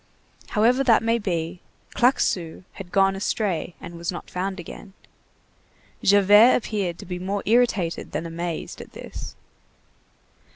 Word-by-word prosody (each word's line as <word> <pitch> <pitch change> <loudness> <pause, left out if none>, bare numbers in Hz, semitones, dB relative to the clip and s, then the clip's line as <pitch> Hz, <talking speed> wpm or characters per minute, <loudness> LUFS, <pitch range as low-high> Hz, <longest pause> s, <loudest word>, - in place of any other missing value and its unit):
However 245 +5 +4
that 230 -4 +4
may 230 +1 +2
be, 175 -3 -3 0.3
Claquesous 185 -10 +1
had 185 -3 -10
gone 195 0 +3
astray 195 -3 -2
and 170 - -9
was 170 +1 -2
not 175 - -8
found 190 +1 -3
again. 185 +3 -10 1.1
Javert 205 +4 +6
appeared 200 -7 -2
to - - -10
be 180 0 -5
more 195 +2 -3
irritated 215 -7 +1
than 165 - -3
amazed 170 0 -5
at - - -13
this. - - -8
195 Hz, 130 wpm, -24 LUFS, 175-215 Hz, 1.1 s, Javert